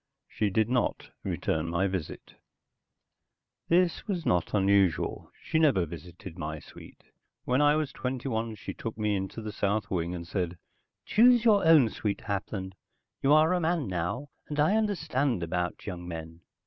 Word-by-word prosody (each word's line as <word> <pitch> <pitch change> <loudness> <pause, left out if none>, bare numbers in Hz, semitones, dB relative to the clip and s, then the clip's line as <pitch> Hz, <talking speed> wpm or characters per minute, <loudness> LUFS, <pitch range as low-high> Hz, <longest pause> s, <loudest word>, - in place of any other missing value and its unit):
She 105 - -1
did 110 +2 +2
not 125 0 -1
return 80 +1 -1
my 85 +3 +1
visit. 95 -5 -4 1.3
This 175 +3 +2
was 180 -5 -2
not 90 +3 +1
unusual. 100 -3 +2
She 160 - 0
never 135 - +4
visited 85 +2 -10
my 75 -1 -4
suite. - - -14 0.4
When 125 +3 +1
I 145 0 +5
was 155 -3 -1
twenty 130 0 -4
one 115 -2 -2
she 105 - -7
took 115 - -6
me 105 -1 0
into 95 +3 -4
the 110 - -4
south 105 +1 -1
wing 85 -1 -1
and 85 -1 -7
said, 90 -2 -2 0.5
"Choose 240 +1 +5
your 210 -3 +5
own 155 -7 +7
suite, 105 -1 -3
Hapland. 100 -2 -4 0.5
You 135 - +3
are 155 +3 +5
a 180 - +2
man 165 -3 0
now, 95 +10 -3 0.2
and 150 0 -4
I 155 +8 +4
understand 150 - 0
about 90 +1 -3
young 90 -3 -6
men." 80 0 -7
105 Hz, 160 wpm, -28 LUFS, 90-150 Hz, 1.3 s, own